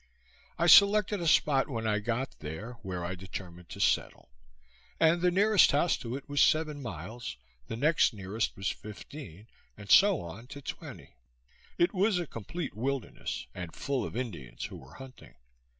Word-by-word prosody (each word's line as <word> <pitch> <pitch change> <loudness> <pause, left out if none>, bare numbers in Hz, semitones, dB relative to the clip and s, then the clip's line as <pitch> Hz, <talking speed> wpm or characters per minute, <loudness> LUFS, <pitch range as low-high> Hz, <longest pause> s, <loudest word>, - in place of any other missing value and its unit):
I 170 - +1
selected 200 +2 +6
a 170 - -1
spot 145 -3 +3
when 115 -4 -3
I 105 -1 +1
got 120 +5 -3
there, 80 +11 -6
where 90 -2 -4
I 90 - -3
determined 90 -1 -9
to - - -9
settle; - - 0 0.7
and 165 +2 +4
the 180 - +4
nearest 200 0 +5
house 150 +3 +3
to 120 -1 -5
it 135 - -8
was 145 0 +1
seven 155 -2 +2
miles, 105 - -6 0.3
the - - -4
next 155 +4 +3
nearest 105 +1 -3
was 95 +1 -1
fifteen, 105 - -10 0.3
and 100 -1 -7
so 195 -4 +7
on 100 +8 -9
to 140 +2 -9
twenty. - - -8 0.6
It 175 - +3
was 200 +1 +2
a 175 - -1
complete 150 - -6
wilderness, 130 - -3
and 90 -3 -7
full 140 -3 -2
of - - -5
Indians 85 - -5
who - - -8
were 65 +3 -14
hunting. 130 - -13
125 Hz, 165 wpm, -30 LUFS, 95-160 Hz, 0.7 s, so